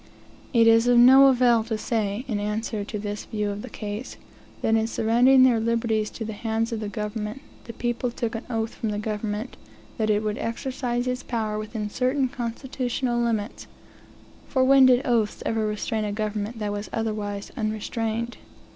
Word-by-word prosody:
It 230 -3 +5
is 230 +1 +5
of 245 0 +5
no 265 +3 +8
avail 245 -3 +4
to 225 -1 -2
say, 215 +1 -2
in 215 -5 -1
answer 210 +1 -2
to 210 +1 -5
this 205 0 -5
view 210 -1 -2
of 200 +1 -5
the - - -8 0.2
ease, 210 +5 -5 0.5
that 220 - +2
in 225 0 +2
surrendering 245 +4 +4
their 245 -3 +5
liberties 225 -1 0
into 225 - -6
the 220 - -5
hands 225 +2 -2
of 225 - -2
the 210 -1 -4
government, 210 +3 -4 0.3
the 230 - -8
people 240 +2 -2
took 235 -1 -3
an 225 +1 -4
oath 225 -2 -2
from 225 - -3
the 205 - -2
government, 210 +2 -4 0.4
that 220 -1 +1
it 210 0 +2
would 210 0 -2
exercise 245 +1 -2
its 250 0 -2
power 215 -4 -2
within 215 0 -4
certain 260 +4 0
constitutional 245 0 -2
limits; 225 -2 -2 0.8
for 260 -2 +2
when 265 0 +7
did 255 +1 +4
oaths 225 -4 0
ever 220 -1 0
restrain 215 +1 -2
a 210 - -2
government 215 +1 -3
that 210 -2 -2
was 205 0 -5
otherwise 210 -2 -3
unrestrained? 225 +1 -2
225 Hz, 180 wpm, -25 LUFS, 210-240 Hz, 0.8 s, no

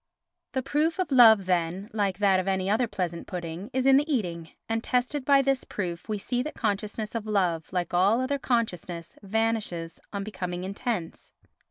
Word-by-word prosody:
The 260 -1 -1
proof 310 +5 +1
of 370 -5 -1
love, 225 -6 +7
then, 180 +2 0
like 200 -4 0
that 195 -2 +4
of 185 - -3
any 190 0 0
other 235 +3 +2
pleasant 180 -5 -4
pudding, 175 +3 -5
is 260 0 0
in 270 0 +7
the 295 +3 +1
eating, 170 - -2 0.2
and 225 0 -1
tested 250 +3 0
by 275 0 +5
this 270 -1 +1
proof 175 -1 -5
we 215 - 0
see 245 +5 -1
that 305 +4 -5
consciousness 210 0 -2
of 225 -2 -4
love, 180 -6 0
like 180 -2 -2
all 195 +6 +4
other 275 +2 -1
consciousness 185 -9 -2
vanishes 210 -5 -1
on 200 -1 -3
becoming 180 -3 -4
intense. 200 -2 -4
205 Hz, 180 wpm, -27 LUFS, 180-245 Hz, 0.2 s, love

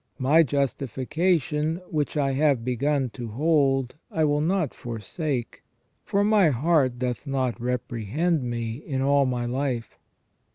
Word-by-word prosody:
My 145 +5 +5
justification, 150 - 0 0.2
which 150 -1 -1
I 140 -2 +2
have 135 -4 +2
begun 130 +1 0
to 120 -1 -6
hold, 135 +1 +1
I 160 - 0
will 145 0 +1
not 170 -2 0
forsake: 120 - -4 0.4
for 200 +1 +1
my 205 -5 +4
heart 135 -2 +2
doth 125 +2 -3
not 130 -3 -1
reprehend 125 - -1
me 120 -2 -3
in 135 -2 -3
all 140 0 +3
my 125 -1 -1
life." 125 -1 -3
135 Hz, 130 wpm, -25 LUFS, 125-155 Hz, 0.4 s, My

